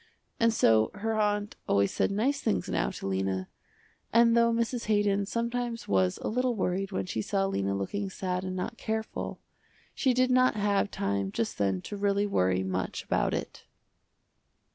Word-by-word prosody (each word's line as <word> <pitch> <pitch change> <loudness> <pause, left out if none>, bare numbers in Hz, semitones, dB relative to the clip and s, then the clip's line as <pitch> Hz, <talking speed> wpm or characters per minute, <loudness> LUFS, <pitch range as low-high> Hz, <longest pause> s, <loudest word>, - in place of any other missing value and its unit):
And 230 0 +4
so 110 - +4
her 220 +2 -2
aunt 210 -1 0
always 100 0 +3
said - - +1
nice 245 +8 0
things 220 - 0
now - - 0
to - - -7
Lena, 95 -1 -1 0.6
and 230 0 +5
though 235 0 +4
Mrs. 235 +1 -1
Haydon 205 -2 +2
sometimes 235 0 -2
was 95 -2 +2
a - - -1
little 250 +1 0
worried 190 -1 -1
when 95 - -2
she 110 - -2
saw 195 - 0
Lena 100 - -1
looking 195 - -3
sad 185 -1 -3
and 185 0 -4
not 230 +6 -4
careful, 220 0 -3 0.5
she 260 -3 +1
did 255 0 +3
not 255 -1 +4
have 205 -1 +1
time 100 - -2
just 115 +1 -2
then 95 -2 0
to 205 - -6
really 200 0 +1
worry 95 - +1
much 95 0 -3
about - - 0
it. - - -6
200 Hz, 170 wpm, -29 LUFS, -, 0.6 s, and